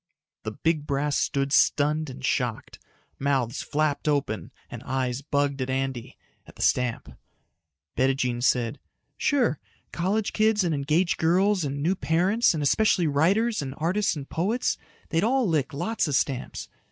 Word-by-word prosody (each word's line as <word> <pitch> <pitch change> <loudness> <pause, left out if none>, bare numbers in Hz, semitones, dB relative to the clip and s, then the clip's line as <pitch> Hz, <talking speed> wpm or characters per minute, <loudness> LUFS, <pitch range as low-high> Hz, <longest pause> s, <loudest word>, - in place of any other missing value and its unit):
The 110 - -5
big 155 +3 -1
brass 140 +1 0
stood 140 0 0
stunned 150 +1 +3
and 130 0 -7
shocked. 125 -7 -2 0.4
Mouths 135 -4 0
flapped 155 0 -1
open 140 -7 -1 0.2
and - - -8
eyes 130 -1 -2
bugged 140 -1 -1
at 130 - -2
Andy, 130 -2 -3 0.3
at - - -15
the - - -4
stamp. 115 - 0 0.8
Bettijean 130 -2 +1
said, 125 +1 +1 0.4
"Sure. 250 - +1 0.3
College 200 +5 -1
kids 215 -2 +3
and 170 -3 0
engaged 155 +5 +1
girls 185 +3 +2
and 140 0 -3
new 175 +4 +2
parents 185 +5 +2
and 150 - -2
especially 180 +3 +3
writers 190 +10 +2
and 135 -1 -5
artists 185 +6 0
and 140 -2 -7
poets 210 +9 0 0.3
they'd 165 0 +1
all 255 +1 +2
lick 155 -4 0
lots 220 +8 -1
of 145 - 0
stamps. 130 -1 -2
145 Hz, 150 wpm, -26 LUFS, 135-180 Hz, 0.8 s, stunned